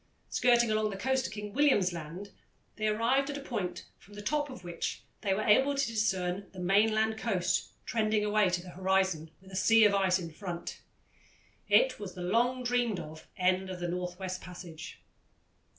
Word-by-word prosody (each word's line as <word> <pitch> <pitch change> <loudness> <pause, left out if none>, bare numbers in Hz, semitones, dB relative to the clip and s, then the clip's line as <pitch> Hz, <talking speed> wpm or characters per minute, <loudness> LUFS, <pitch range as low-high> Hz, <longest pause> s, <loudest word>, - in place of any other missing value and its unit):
Skirting 240 -2 +4
along 215 0 +1
the 195 - -5
coast 265 +5 0
of - - -9
King 210 -1 -6
William's 245 -11 +3
Land, 170 +5 -7 0.5
they 215 0 0
arrived 235 +6 +2
at 285 - -3
a - - -5
point 215 -10 -4
from 205 - -16
the 205 - -7
top 290 +5 0
of 255 -8 -10
which 175 -1 -4 0.2
they 200 - 0
were 205 +3 +1
able 265 +7 +4
to 275 0 +1
discern 195 -4 -1
the 185 - -9
mainland 215 +4 +2
coast 190 -6 0 0.2
trending 215 -2 +1
away 210 -2 +3
to 175 0 -1
the 180 - -10
horizon, 190 -4 0
with 190 +1 -16
a - - -7
sea 225 +3 +5
of 205 - +4
ice 190 -2 +3
in 170 -3 -6
front. 175 0 -6 0.9
It - - +4
was 195 -3 -7
the 180 - -6
long 240 +7 +1
dreamed 245 -5 +1
of 155 +1 -9
end 185 +1 +1
of 185 -1 -6
the 175 - -2
North 180 0 -3
West 185 -1 -5
Passage. 175 -3 -9
200 Hz, 190 wpm, -30 LUFS, 180-225 Hz, 0.9 s, sea